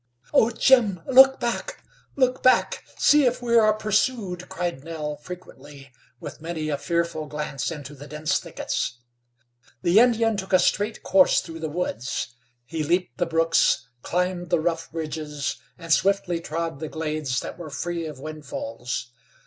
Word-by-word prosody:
"Oh! 225 - +5
Jim! 230 -5 +4
Look 265 0 +7
back! 250 - -3 0.3
Look 255 -2 +1
back! 255 - +3
See 295 -1 +5
if 245 - 0
we 235 -1 0
are 215 -2 +6
pursued!" 215 -3 -1
cried 170 -6 -3
Nell 155 -2 -4
frequently, 145 -5 -11 0.3
with - - -9
many 160 -2 -4
a 145 -2 -1
earful 170 -2 0
glance 150 -2 -3
into 150 -3 -7
the 145 +1 -11
dense 150 0 -1
thickets. 120 - -3 0.9
The 175 +5 +5
Indian 225 -2 +3
took 190 -1 -5
a - - +8
straight 205 +4 0
course 190 -1 +5
through 165 -1 -8
the 160 -1 -3
woods. 135 -7 -3 0.3
He 155 +4 -3
leaped 170 -4 0
the 175 - +1
brooks, 165 -5 +2
climbed 180 +1 -1
the 175 - +3
rough 165 0 -1
ridges, 155 -3 -4 0.2
and 165 -2 0
swiftly 190 -2 +2
trod 165 -2 -4
the 155 -1 -5
glades 155 -5 -2
that - - -8
were 165 -3 -7
free 165 +2 -3
of 150 -4 -8
windfalls. 135 -5 -5
165 Hz, 155 wpm, -24 LUFS, 150-195 Hz, 0.9 s, a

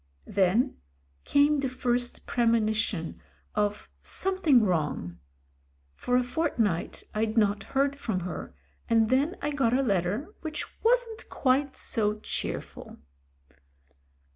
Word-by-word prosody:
Then 200 +7 +2 0.5
came 290 +1 +4
the 270 -1 0
first 245 -1 -1
premonition 220 -6 +1 0.3
of 210 0 -1 0.2
something 355 -11 +2
wrong. 150 - -1 0.7
For 250 - 0
a 250 - +3
fortnight 245 - -1
I'd 220 +1 -1
not 205 -2 +3
heard 275 +5 0
from 220 -9 -2
her, 180 +1 -6 0.3
and 225 -1 +4
then 280 +7 +2
I 295 - 0
got 260 -5 +2
a 275 - +2
letter 205 - 0
which 310 -2 -4 0.2
wasn't 460 -1 +1
quite 270 +1 +1
so 210 -3 0
cheerful. - - -5
240 Hz, 115 wpm, -28 LUFS, 210-280 Hz, 0.7 s, came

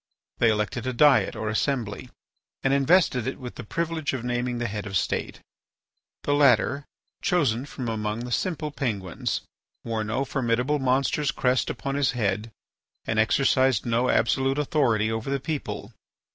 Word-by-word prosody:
They 115 - +5
elected 110 +3 -1
a 130 - -1
diet 145 +2 +4
or 110 - -4
assembly, 115 0 -1 0.5
and 135 - +2
invested 140 -3 +3
it 130 - -3
with 125 -2 -7
the - - -8
privilege 165 +5 -2
of 130 -3 -3
naming 125 0 -1
the 120 - -2
Head 105 -1 -5
of 100 - -7
the - - +3
State. - - -2 0.8
The 145 - +1
latter, 140 0 +3 0.4
chosen 145 - +1
from 130 -4 -6
among 110 0 -2
the 120 0 -6
simple 155 +1 -1
Penguins, 105 - -2 0.4
wore 115 -1 -2
no 110 +6 -1
formidable 130 +3 0
monster's 135 +2 +1
crest 125 0 +1
upon 140 - -3
his 140 -3 +1
head 105 -2 -1 0.6
and 110 -1 0
exercised 130 +1 +3
no 120 +2 +1
absolute 135 +4 +2
authority 130 -8 +1
over 110 +3 -3
the 140 0 0
people. 150 +2 -4
125 Hz, 160 wpm, -26 LUFS, 110-140 Hz, 0.8 s, They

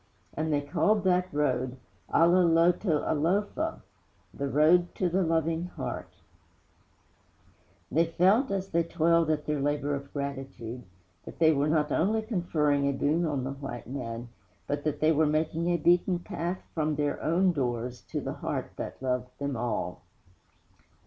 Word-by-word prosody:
And 155 +1 -2
they 145 -1 +2
called 190 +8 +1
that 180 -1 +2
road 130 -3 0 0.3
Ala 170 +2 +5
Loto 170 0 +3
Alofa 200 - 0 0.5
The 140 - -3
Road 165 +5 +4
to 185 - 0
the 185 +3 +1
Loving 165 0 0
Heart. 180 - -6 1.8
They 165 +2 +3
felt, 190 +10 +3
as 195 -1 -2
they 170 - +2
toiled 165 -1 +2
at 150 -1 0
their 150 -1 -1
labor 145 0 0
of 140 0 -5
gratitude, 135 -4 -5 0.4
that - - -10
they 160 -1 +5
were 145 0 +1
not 150 -1 +1
only 220 +6 +1
conferring 150 - +1
a - - 0
boon 155 +5 +1
on 140 -4 -1
the 130 - -3
white 135 -3 -7
man, 120 -2 -5 0.4
but 145 0 -2
that 150 -1 -1
they 155 +1 +5
were 155 0 +3
making 160 +3 0
a 175 - +2
beaten 175 +3 +3
path 175 0 -4
from 155 -2 0
their 145 0 -1
own 180 +4 +3
doors 125 -4 -2
to - - -2
the - - -4
heart - - -4
that - - -6
loved 125 -1 -1
them 140 -1 -3
all. 110 -7 -3
155 Hz, 155 wpm, -28 LUFS, 140-175 Hz, 1.8 s, Ala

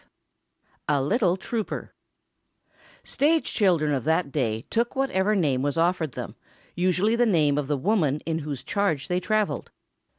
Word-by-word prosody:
V - - -32 0.9
A - - +2
LITTLE 185 - +1
TROUPER 220 +3 -4 1.1
Stage 315 +3 +1
children 170 -8 +2
of 130 -4 -1
that 160 0 +1
day 115 -6 -1
took 235 +3 0
whatever 215 -6 +1
name 145 -9 +1
was 145 +3 -1
offered 165 -4 +1
them, - - -6 0.4
usually 185 +5 +1
the 240 0 +3
name 155 -8 +3
of 145 -2 -1
the 145 0 0
woman 155 -3 +1
in 160 -1 -2
whose 145 -4 -5
charge 195 -9 -1
they 180 0 +1
traveled. 215 +3 -1
175 Hz, 155 wpm, -25 LUFS, 145-210 Hz, 1.1 s, the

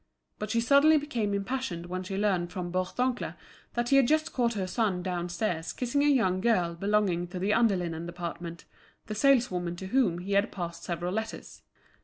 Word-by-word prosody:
But 210 - -4
she 230 - +1
suddenly 280 +5 +6
became 245 -8 -1
impassioned 200 -3 -2
when 185 +1 -4
she 190 +1 -5
learnt 190 -4 +1
from 175 -2 -4
Bourdoncle 245 +8 -1 0.4
that 240 0 0
he 275 - +5
had 270 -3 +5
just 310 +3 +1
caught 235 -3 +1
her 195 -2 -1
son 185 -2 0
downstairs 175 -1 -2
kissing 255 +3 0
a - - +4
young 220 -10 +3
girl 180 -7 +2
belonging 195 -1 +1
to 180 - -7
the 195 +3 +1
under 225 -3 +4
linen 170 -2 -3
department, 170 -1 -6 0.4
the 215 - -5
saleswoman 220 -8 +2
to 190 - -7
whom 200 -4 +2
he 185 +3 -6
had 200 +1 +2
passed 170 -2 -5
several 175 +1 -3
letters. 220 +1 -5
195 Hz, 185 wpm, -29 LUFS, 175-235 Hz, 0.4 s, suddenly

